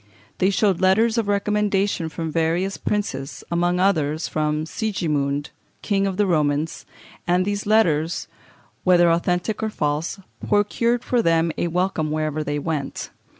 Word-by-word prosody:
They 190 - +3
showed 195 -2 +1
letters 220 +5 +3
of 220 - -1
recommendation 200 -3 0
from 160 +1 -4
various 170 +4 0
princes, 140 -11 -3
among 175 +1 +1
others 160 -5 +1
from 155 0 -1
Sigismund, 150 -8 -2 0.3
King 195 -2 +1
of 190 -1 -3
the 205 - +3
Romans, 155 -3 0 0.4
and 180 +1 +2
these 205 0 -2
letters, 175 -5 +2 0.6
whether 175 -2 +5
authentic 180 +5 0
or 220 - 0
false, 150 0 -2 0.3
procured 230 +4 +1
for 245 -2 +1
them 165 -3 +2
a - - -1
welcome 175 -2 0
wherever 155 0 -1
they 145 0 -2
went. 145 -2 -4
175 Hz, 140 wpm, -22 LUFS, 155-200 Hz, 0.6 s, whether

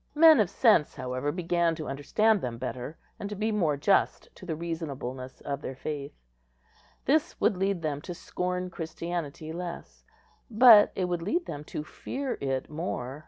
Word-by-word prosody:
Men 315 -1 +8
of 205 -5 +3
sense, 210 - +3
however, 130 +3 -2
began 170 0 +1
to 155 -1 -6
understand 205 +10 +2
them 120 -2 -4
better, 130 +4 -5 0.2
and 200 - -4
to 210 - -5
be 215 +2 -1
more 165 -9 +1
just 195 +7 +2
to 185 - -12
the 160 - -2
reasonableness 140 -6 -5
of 140 -1 -4
their 130 - -5
faith. 145 +1 -5 0.9
This 310 +5 +1
would - - +3
lead 190 -2 -1
them 145 -2 -2
to 175 - -7
scorn 180 +1 -3
Christianity 165 -2 -5
less, 175 0 -7 0.5
but 225 -2 +8
it 185 - 0
would 175 -1 -2
lead 335 - -1
them 145 -1 -6
to 150 - -5
fear 265 - -5
it 135 -1 -1
more. 150 -4 -4
170 Hz, 165 wpm, -28 LUFS, 145-200 Hz, 0.9 s, Men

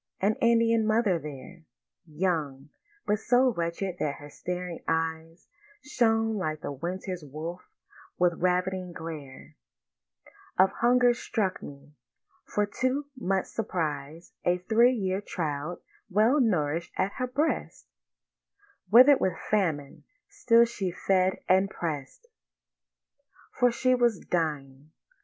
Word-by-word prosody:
An 205 +3 +2
Indian 230 -1 +3
mother 215 -5 +2
there, 150 +4 -10 0.5
Young, 150 -4 -2 0.4
but 210 0 +1
so 250 +2 +3
wretched 170 +1 -3
that 145 -2 -1
her 145 0 -12
staring 180 0 -5
eyes 165 +1 -2 0.4
Shone 225 -5 +1
like 155 -5 -3
the - - -4
winter 180 +6 -4
wolf's 155 +5 -7 0.5
with 175 -1 +3
ravening 180 0 0
glare 155 -5 -9 1.0
Of 190 +1 +5
hunger, 245 +1 +3
struck 215 -5 -2
me. 140 +1 -11 0.5
For 210 - 0 0.2
to 260 +3 +1
much 195 -6 -1
surprise 160 -6 -4
A 175 0 +2
three 225 +7 +3
year 190 -4 -1
child 160 -3 -4 0.3
well 220 +9 +3
nourish'd 170 - 0
at 195 - +1
her 255 -1 -1
breast, 290 +6 -2 1.0
Wither'd 255 +5 +8
with 185 -3 0
famine, 160 -9 -1 0.2
still 235 -2 +4
she 205 -5 -3
fed 185 +1 0
and 190 +1 +4
press'd— 155 - -5 1.3
For 245 -1 +3
she 255 +2 +2
was 240 -4 +2
dying. 150 -4 -3
185 Hz, 115 wpm, -28 LUFS, 160-225 Hz, 1.3 s, Wither'd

